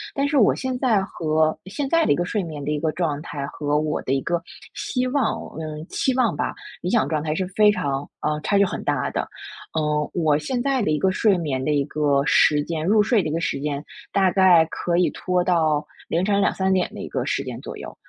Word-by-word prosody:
但 280 0 +1
是 285 0 +1
我 215 - +5
现 260 -1 -3
在 220 -7 +2
和 155 -4 0
现 205 +9 -3
在 330 +4 +3
的 - - +2
一 - - +5
个 175 - -1
睡 210 +2 -1
眠 155 -4 -6
的 150 - -1
一 150 - -1
个 160 0 0
状 155 -5 -1
态 150 -3 -5
和 145 0 -1
我 155 0 -1
的 130 - -1
一 135 - +1
个 170 +3 -1 0.3
希 250 -2 -2
望 275 +1 +1 0.2
嗯， 155 0 -6
期 260 - 0
望 250 -4 +2
吧 - - -2 0.3
理 180 - -2
想 225 +1 +2
状 155 -2 -1
态 155 0 -2
是 185 - -1
非 210 +2 +5
常 140 -7 -2 0.2
嗯， 150 0 -1
差 200 - +1
距 200 - +5
很 195 - -4
大 - - -1
的。 - - -1 0.6
嗯， 150 -1 0
我 155 -4 +3
现 245 - -2
在 265 0 +1
的 200 - 0
一 150 - +2
个 190 +3 +2
睡 200 0 +3
眠 140 -6 -2
的 150 - -1
一 145 -2 +1
个 145 -2 +1
时 145 +3 +4
间， 160 -1 -3
入 210 +4 +4
睡 225 -1 +3
的 155 - -3
一 - - -3
个 165 - -1
时 165 - -2
间 145 -1 -3 0.3
大 190 -2 +3
概 180 -4 +6
可 175 0 -1
以 180 - +4
拖 180 -1 0
到 155 -4 +2 0.2
凌 175 +3 0
晨 200 -1 +2
2，3 190 0 +1
点 185 -1 0
的 - - -7
一 - - -5
个 - - -2
时 - - -1
间 - - -7
左 - - -8
右。 - - -9
170 Hz, 260 characters per minute, -23 LUFS, 150-200 Hz, 0.6 s, 概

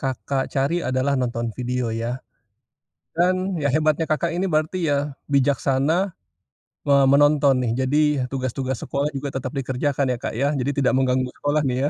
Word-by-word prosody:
Kakak 135 +1 -2
cari 140 +6 0
adalah 130 +2 0
nonton 120 -2 -2
video, 125 -2 -2
ya. 115 +2 -3 1.0
Dan, 185 +1 +1
ya 145 - -1
hebatnya 155 +1 +2
Kakak 155 +2 0
ini 190 +2 0
berarti, 160 +2 0
ya 140 0 -1 0.2
bijaksana, 140 +6 +2 0.7
me 140 -1 +3
menonton, 145 0 +4
nih. 115 - 0 0.2
Jadi, 150 +3 +3 0.2
tugas-tugas 130 -1 -3
sekolah 140 +1 -1
juga 140 +1 -3
tetep 130 -1 -3
dikerjakan, 135 +1 -1
ya 125 - -1
Kak, - - -4
ya. 140 +4 +1
Jadi 135 +3 0
tidak - - +3
mengganggu 130 -1 +1
sekolah, 145 +1 +1
nih 125 -2 0
ya? - - -1
140 Hz, 160 wpm, -23 LUFS, 130-150 Hz, 1.0 s, menonton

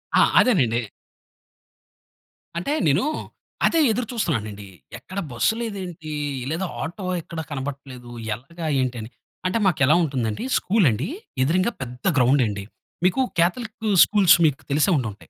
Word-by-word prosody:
ఆ! - - +6 0.2
అదేనండి. 120 - +3 1.7
అంటే 180 +12 -1
నేను 145 +5 +3 0.6
అదే 330 - +3
ఎదురు 230 +1 -2
చూస్తున్నానండి. 110 - -2 0.3
ఎక్కడ 185 +11 -7
బస్సు 120 - +2
లేదేంటి? 185 -8 -6 0.4
లేదా 165 +5 -2 0.2
ఆటో 185 +4 -5 0.2
ఎక్కడ 165 0 -8
కనపడట్లేదు 135 -3 -6 0.3
ఎలాగా 165 +9 -9 0.2
ఏంటి 125 -1 -2
అని. 110 - -8 0.4
అంటే 185 +4 +1
మాకెలా 155 -5 +4
ఉంటుందండి 130 - -2
స్కూల్ 205 -1 +2
అండి. 115 +8 -2 0.4
ఎదురంగా 185 - +2
పెద్ద 125 0 -7
గ్రౌండ్ 130 +1 +4
అండి. 100 -1 -4 0.4
మీకు 185 +9 +3 0.2
కాథలిక్ 220 +6 0 0.2
స్కూల్స్ 205 -5 +5
మీకు 145 -1 0
తెలిసే 150 +7 +3
ఉండి 125 -4 -1
ఉంటాయి. 100 - -17
150 Hz, 130 wpm, -23 LUFS, 125-190 Hz, 1.7 s, ఆ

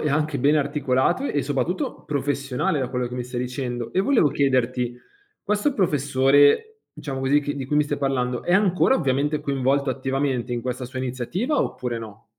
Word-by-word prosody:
e 150 - 0
anche 150 -1 0
ben 145 +4 +3
articolato 145 - +1
e 145 - 0
soprattutto 145 +6 -2
professionale 140 -1 -1
da 130 -2 -1
quello 125 -1 -2
che 125 - -7
mi 125 -1 -3
stai 125 0 -4
dicendo. 125 -1 -4
E 190 - +1
volevo 210 - +3
chiederti, 125 -3 0 0.5
questo 210 +8 0
professore 145 - +3 0.2
diciamo 135 -3 -4
così 140 +2 +3
che 145 0 -3
di 140 -2 -4
cui 150 +3 -1
mi 150 - +4
stai 145 0 -2
parlando, 125 -3 -1
è 175 - -1
ancora 195 +5 +3
ovviamente 145 - 0
coinvolto 140 0 0
attivamente 130 -1 -1
in 120 - -1
questa 125 +1 -4
sua 130 +1 -7
iniziativa 130 - -2
oppure 125 -2 -2
no? 110 -1 -11
135 Hz, 180 wpm, -23 LUFS, 125-150 Hz, 0.5 s, mi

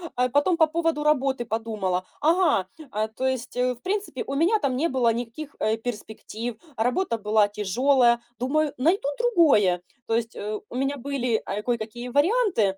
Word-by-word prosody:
а, 250 +1 +2
потом 290 +7 +2
по 320 - +6
поводу 325 -1 0
работы 270 -4 +1
подумала: 215 -5 -2 0.2
"Ага, 325 - +3 0.2
а, 215 +1 -1
то 225 +4 -4
есть, 260 -2 -3
э, 250 0 +2
в 240 - -23
принципе, 410 +4 -2
у - - -3
меня 345 +9 +3
там 275 -6 0
не 320 +6 +1
было 245 -4 +2
никаких, 245 +6 -6
э, 220 +1 +1
перспектив, 225 0 -6 0.2
работа 245 +3 0
была 210 0 +3
тяжёлая, 235 +4 +3 0.2
думаю, 295 +4 +1
найду 320 +4 +2
другое". 290 - +4 0.3
То 225 - +1
есть, 230 -1 -2
э, 210 +1 -4
у - - -9
меня 275 +2 -1
были, 255 -4 -1
а, 210 - -3
кое-какие 240 0 -3
варианты. 290 - +2
250 Hz, 170 wpm, -25 LUFS, 220-300 Hz, 0.3 s, по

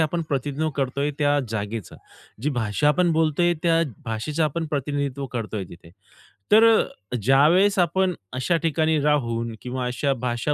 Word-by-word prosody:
आपण 160 +2 0
प्रतिनिधित्व 145 +2 -1
करतोय 140 +1 -1
त्या 145 -1 +2
जागेचा. 110 -1 -5 0.5
जी 150 - 0
भाषा 110 +5 +1
आपण 175 +2 +3
बोलतोय, 160 +2 +2
त्या 165 -1 +3 0.2
भाषेचं 120 +8 -2
आपण 160 +2 -2
प्रतिनिधित्व 140 -1 -2
करतोय 105 -4 -3
तिथे. 85 -1 -14 0.6
तर 220 +2 +7
अ, 125 - 0
ज्यावेळेस 150 - +4
आपण 180 +2 +2 0.2
अशा 130 +7 0
ठिकाणी 160 -1 +1
राहून 115 -6 0
किंवा 125 0 -4
अशा 125 +3 0
भाषा 120 +5 -1
145 Hz, 140 wpm, -23 LUFS, 120-160 Hz, 0.6 s, तर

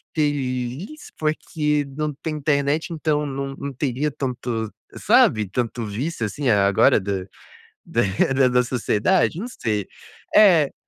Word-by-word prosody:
feliz 145 - -2
porque 150 -1 -1
não 150 -1 -1
tem 155 -1 -3
internet, 145 +2 0
então 150 -1 0
não 135 0 -4
não 140 -1 -6
teria 140 +2 -1
tanto, 125 -5 -3 0.3
sabe, 105 -2 +4
tanto 120 +1 -2
vício, 115 +4 -3
assim, 130 +6 -2
agora 100 -1 +4
da 95 -1 -3 0.6
da 120 +5 +2
da 125 0 +3
sociedade, 130 - +1
não 235 - -4
sei. 105 - -2 0.5
É. 175 -9 +6
135 Hz, 120 wpm, -22 LUFS, 115-150 Hz, 0.6 s, É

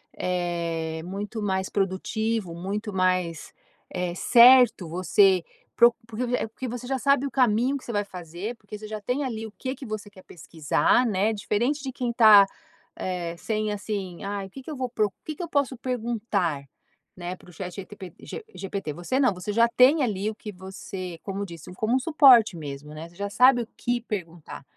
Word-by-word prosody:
eh, 170 -3 -2
muito 205 +4 -5
mais 190 -2 -1
produtivo, 200 0 -1
muito 200 +5 -4
mais, 185 -3 0 0.4
eh, 180 -1 -3
certo, 235 -2 +6
você 185 +2 +3 0.3
procu 235 0 +5
porque, 225 +2 -4
eh - - -2
porque 240 +4 -7
você 245 0 -6
já 265 +1 -2
sabe 280 0 +3
o 275 - -4
caminho 250 +2 +2
que 270 - -13
você - - -6
vai 205 -2 0
fazer, 180 +3 -7
porque 210 -1 -10
você 215 +1 -9
já 215 0 -6
tem, 250 +7 -1
ali, 225 -4 -4
o - - -12
que 260 +4 -5
que 270 -1 -9
você 215 -1 -5
quer 195 -2 -16
pesquisar, 165 - +1
né, 215 -1 +1
diferente 235 +7 -1
de 270 - -4
quem 250 -2 -2
está, 215 -4 +8 0.5
eh, 175 -2 -4
sem, 215 +2 -2
assim, 200 -4 -5
"ai, 200 0 -3
o - - -17
que 270 - -9
que 265 - -11
eu 305 - -4
vou 255 -1 -2
pro 215 -3 +1
o 200 - -14
que 310 - -5
que - - -8
eu 340 - -6
posso 280 -2 0
perguntar?", 225 - -2 0.5
né, 180 0 -5
para 180 - -18
o - - -15
ChatGPT 185 +1 -8
G - - -8
GPT. 195 -5 -5
Você 175 - -2
não, 255 -7 +3
você 180 +3 -5
já 230 +3 +4
tem, 255 +6 +5
ali, 210 -3 -1
o 220 - -6
que 215 0 -8
você, 190 -2 -8
como 195 0 -4
disse, 170 -2 -9
como 220 +6 0
um - - +3
suporte 260 - +6
mesmo, 150 -1 -8
né, 160 +2 -8
você 170 - -22
já 200 +2 -4
sabe 250 +1 +5
o - - -13
que 240 0 -1
perguntar, 175 - -7
205 Hz, 200 wpm, -25 LUFS, 180-240 Hz, 0.5 s, está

